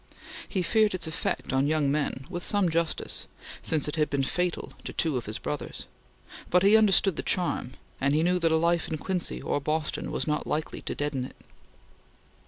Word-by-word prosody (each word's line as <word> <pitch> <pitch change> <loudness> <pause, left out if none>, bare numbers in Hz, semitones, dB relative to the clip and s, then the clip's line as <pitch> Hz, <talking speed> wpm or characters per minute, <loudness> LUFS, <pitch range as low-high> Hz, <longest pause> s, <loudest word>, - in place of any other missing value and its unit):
He 190 -3 0
feared 210 +3 +3
its 185 - 0
effect 160 -4 -2
on 135 +2 +3
young 150 -2 +2
men, 145 -2 -1
with 175 -1 -5
some 200 -1 +2
justice, 165 0 -1 0.3
since 155 -3 +2
it 150 - -3
had 150 -1 +2
been 140 -1 0
fatal 180 +5 -1
to - - -4
two 160 -4 0
of 120 -4 -3
his 105 - -3
brothers; 150 - -5 0.6
but 180 +1 +4
he 200 +2 +7
understood 200 -4 +4
the - - 0
charm, 175 -8 0 0.3
and 140 +2 +2
he 155 - +3
knew 180 +1 +2
that 165 -2 +2
a 160 - +4
life 170 +1 +2
in 155 - -2
Quincy 180 +3 -2
or 145 - 0
Boston 155 +2 -2
was - - -1
not 150 -1 -1
likely 155 +1 -2
to - - -4
deaden 145 -3 -2
it. - - -11
160 Hz, 195 wpm, -28 LUFS, 145-180 Hz, 0.6 s, he